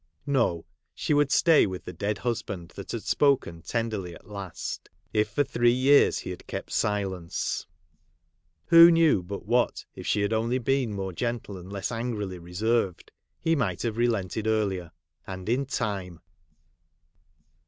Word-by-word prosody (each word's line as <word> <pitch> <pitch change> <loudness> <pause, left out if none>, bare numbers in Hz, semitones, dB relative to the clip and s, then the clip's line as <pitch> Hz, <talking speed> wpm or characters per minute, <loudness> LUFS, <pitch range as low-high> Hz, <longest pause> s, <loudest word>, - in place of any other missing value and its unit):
No! 115 - +1 0.3
she - - 0
would 145 -1 +3
stay 165 -8 +5
with 95 -1 -6
the 90 - -6
dead 100 +5 -2
husband 100 -8 -3
that - - -8
had - - -4
spoken 135 - +2
tenderly 105 -4 -3
at - - -16
last, 100 -3 -6 0.2
if 105 0 +2
for 145 +7 +1
three 120 -2 +2
years 130 +3 +5
he - - -5
had - - -9
kept - - -6
silence; 95 -5 -1 1.0
who 170 0 +9
knew 165 - +4
but 100 +3 -7
what, 120 +3 +1
if - - -8
she 105 - +2
had 100 +2 0
only 115 +3 +1
been 130 -1 0
more 95 -2 -4
gentle 120 -1 -3
and 90 +1 -10
less 100 +2 -3
angrily 110 -6 -3
reserved 95 +3 -1 0.3
he 165 0 +2
might 100 - -1
have 115 -3 -1
relented 110 -3 0
earlier 100 -6 0 0.3
— - - -38
and 95 0 -7
in 130 +4 +1
time 95 -9 -3
105 Hz, 155 wpm, -27 LUFS, 95-120 Hz, 1.0 s, who